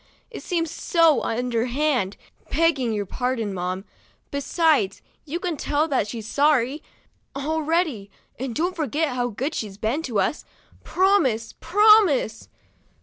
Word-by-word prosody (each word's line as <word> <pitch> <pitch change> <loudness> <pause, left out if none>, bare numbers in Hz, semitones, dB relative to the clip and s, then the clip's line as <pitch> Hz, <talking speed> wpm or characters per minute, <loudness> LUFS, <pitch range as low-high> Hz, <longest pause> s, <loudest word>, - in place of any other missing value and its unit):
It - - -7
seems 330 -3 -2
so 330 -2 +3
underhand, 245 -1 -1 0.3
begging 295 -6 +1
your 205 -2 -2
pardon, 240 -2 -2
mamma. 185 +1 -3 0.5
Besides, 280 - +1 0.3
you 320 +3 -4
can 350 -4 -3
tell 295 +3 0
that 260 -7 +1
she's 220 -1 -6
sorry, 285 0 +2 0.5
already, 310 - -1 0.3
and 255 -2 -4
don't 355 +3 -1
forget 310 0 -1
how 245 -1 -1
good 265 +8 -3
she's 205 -3 -5
been 225 +8 -1
to 240 -10 -2
us. 300 - 0 0.4
Promise, 285 - +2
promise 385 - +4
275 Hz, 125 wpm, -23 LUFS, 225-325 Hz, 0.5 s, promise